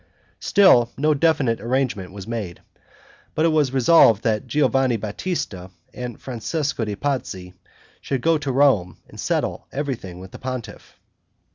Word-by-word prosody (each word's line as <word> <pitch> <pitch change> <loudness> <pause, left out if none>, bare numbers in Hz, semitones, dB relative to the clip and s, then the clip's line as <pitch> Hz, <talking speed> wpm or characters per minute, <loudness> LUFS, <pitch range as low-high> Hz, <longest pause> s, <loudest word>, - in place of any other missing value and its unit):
Still 155 - +5
no 150 +3 +3
definite 140 -7 +1
arrangement 120 -6 -1
was 100 -1 -9
made; 110 -6 -5 0.8
but 155 - +2
it - - +4
was 150 -4 +2
resolved 130 -5 +5
that 110 -2 0
Giovanni 135 -4 +2
Batista 105 - -4 0.3
and 125 -2 -6
Francesco 130 +3 -3
de' 105 -2 -3
Pazzi 100 -9 -3 0.5
should 135 -3 -2
go 165 +1 +2
to 145 -2 -3
Rome 125 - +2
and - - -14
settle - - -2
everything 130 -10 -4
with 95 0 -11
the - - -10
pontiff. 130 -3 -7
125 Hz, 140 wpm, -22 LUFS, 105-145 Hz, 0.8 s, Still